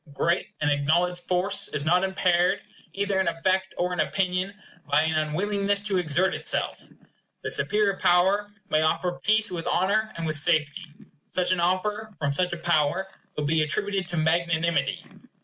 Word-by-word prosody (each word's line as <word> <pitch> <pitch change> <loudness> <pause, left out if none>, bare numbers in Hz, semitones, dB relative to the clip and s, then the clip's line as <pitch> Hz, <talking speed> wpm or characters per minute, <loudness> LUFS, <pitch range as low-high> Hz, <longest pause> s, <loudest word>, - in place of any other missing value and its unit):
Great 170 +5 -1
and 145 -1 +2
acknowledged 175 +5 +1
force 185 +2 +2
is 145 - -4
not 180 +3 +3
impaired, 180 -2 +1 0.3
either 200 -1 -1
in 190 - 0
effect 185 +3 0
or 180 0 -1
in 180 - -4
opinion, 185 +3 0 0.4
by 145 +2 +3
an 160 0 0
unwillingness 200 +5 0
to 200 -2 0
exert 175 +3 +2
itself. - - -2 0.6
The - - -3
superior 210 -2 +1
power 190 +4 +2 0.2
may 155 - +3
offer 170 +3 0
peace 215 -1 +3
with 170 -2 -5
honor 215 +4 +1
and 165 - -4
with 155 -1 +1
safety. 155 +1 +1 0.4
Such 180 0 +1
an 185 - +1
offer 205 +4 -1
from 145 -2 -1
such 180 +4 +1
a 175 - -3
power 170 +2 0 0.3
will 150 - -1
be 155 +2 +2
attributed 195 +4 0
to 175 -2 -4
magnanimity. 165 +1 0
180 Hz, 165 wpm, -25 LUFS, 160-195 Hz, 0.6 s, not